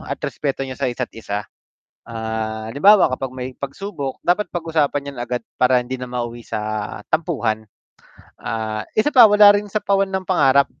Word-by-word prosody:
at - - -5
respeto 135 -2 -2
niyo 130 - -6
sa 130 0 -2
isa't 125 0 -4
isa. 105 -2 -5 0.6
Ah, 110 -1 -4
halimbawa 195 - +5
kapag 130 0 -4
may 130 0 -5
pagsubok 140 +1 -5
dapat 180 +4 +1
pag-usapan 150 -4 -1
yan 135 - -14
agad, 120 0 -3 0.2
para 125 -1 +4
hindi 130 +1 -5
na 125 - -5
mauwi 120 -1 -4
sa 110 -2 -4
tampuhan. 120 -10 -1 0.7
Ah, 110 -1 -3 0.2
isa 250 +7 +2
pa 240 -4 +9
wala 205 0 +8
rin 205 0 -1
sapawan 195 -1 +1
ng 190 -1 -3
pangarap. 140 -3 +4
130 Hz, 160 wpm, -20 LUFS, 115-175 Hz, 0.7 s, pa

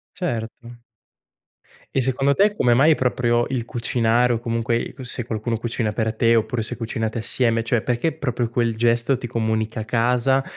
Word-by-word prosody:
Certo. 120 -6 -5 1.1
E - - +4
secondo 135 +2 +1
te, 205 +1 +3
come 120 -1 +3
mai 150 +5 +5
proprio 120 -2 +1
il 125 -3 -2
cucinare 120 0 +1
o 115 - -1
comunque 115 0 -1
il 120 - -2
c 130 - -9
se 120 -1 -3
qualcuno 115 0 -2
cucina 115 -1 -2
per 110 0 -1
te, 115 +1 +2
oppure 115 +1 0
se - - -3
cucinate 115 -1 -3
assieme, 115 0 +1
cioè 115 0 0
perché 125 +7 0
proprio 125 -6 -2
quel 115 -1 0
gesto 120 +3 +2
ti 120 -1 -6
comunica 110 -1 -2
casa? 125 +3 +2
120 Hz, 170 wpm, -22 LUFS, 115-125 Hz, 1.1 s, mai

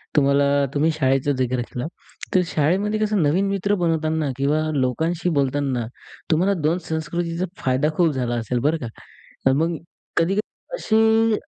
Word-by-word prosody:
तुम्हाला 140 0 +3
तुम्ही 155 +3 +2
शाळेचं 135 -2 +1
जिकर 125 -1 0
केला. 120 +3 -5 0.5
तर 185 - +6
शाळेमध्ये 190 +8 +1
कसं 210 -3 +1
नवीन 180 +7 +2
मित्र 200 +1 0
बनवताना 160 -4 0
किंवा 145 +3 +1
लोकांशी 160 +7 0
बोलतांना 135 -3 0 0.5
तुम्हाला 185 +5 +3
2 160 +4 +2
संस्कृतीचा 165 +2 -2 0.2
फायदा 130 +3 +2
खूप 170 -3 +4
झाला 120 -2 -1
असेल 120 +1 -1
बरं 160 +2 +2
का. 120 - -3 0.6
अ, 135 - +6
मग 165 +3 0 0.4
कधी-कधी 195 - -1
असे 225 - +3
155 Hz, 140 wpm, -22 LUFS, 135-180 Hz, 0.6 s, तर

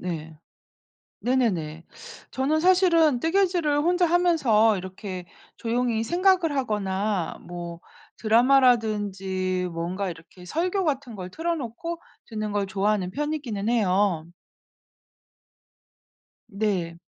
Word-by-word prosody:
네. 160 -3 -5 0.9
네네네. 180 -11 0 0.5
저는 285 +4 0
사실은 335 -6 +4
뜨개질을 340 -3 +2
혼자 355 +2 +3
하면서 300 - +3
이렇게 185 0 -7 0.3
조용히 235 -1 0
생각을 350 - +2
하거나 205 -6 -1
뭐 175 -1 -7 0.4
드라마라든지 210 -7 +2
뭔가 180 +4 -3
이렇게 170 +2 -12
설교 365 - -1
같은 275 -6 -2
걸 185 -2 -6
틀어 335 - -2
놓고 320 +6 -5 0.3
듣는 215 -2 -4
걸 205 -1 0
좋아하는 195 -1 0
편이기는 280 -6 -3
해요. 195 -7 +2 2.2
네. 195 -5 -2
220 Hz, 230 characters per minute, -25 LUFS, 185-300 Hz, 2.2 s, 사실은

